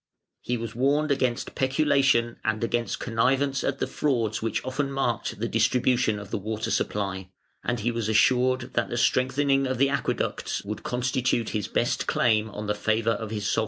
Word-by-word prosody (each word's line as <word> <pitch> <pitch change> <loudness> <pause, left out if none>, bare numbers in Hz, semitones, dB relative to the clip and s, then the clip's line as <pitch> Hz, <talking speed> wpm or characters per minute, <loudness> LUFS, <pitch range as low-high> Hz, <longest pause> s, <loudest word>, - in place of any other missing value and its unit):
He 125 - -2
was 115 -2 -5
warned 145 +5 +1
against 130 -3 0
peculation 135 -3 +2
and 110 0 -1
against 120 0 -1
connivance 130 +4 +1
at 135 - -1
the - - -1
frauds 115 -7 -1
which 110 +1 -2
often 140 +2 -2
marked 120 -6 -2
the 115 - -1
distribution 115 0 +2
of 100 - -9
the - - -1
water 110 +2 -3
supply, 95 -2 -2 0.3
and 120 -2 -1
he 120 +3 0
was 115 -2 -2
assured 125 +3 +2
that - - 0
the 120 - -3
strengthening 135 +2 +2
of 130 - -1
the 135 +2 +3
Aqueducts 140 - -2
would 105 +1 -5
constitute 125 -1 0
his 105 -3 -2
best - - 0
claim 110 -2 +2
on 105 +1 -6
the 105 - 0
favour 110 +2 +1
of 110 0 -3
his 105 -2 -3
sovereign. - - +1
120 Hz, 180 wpm, -26 LUFS, 110-130 Hz, 0.3 s, the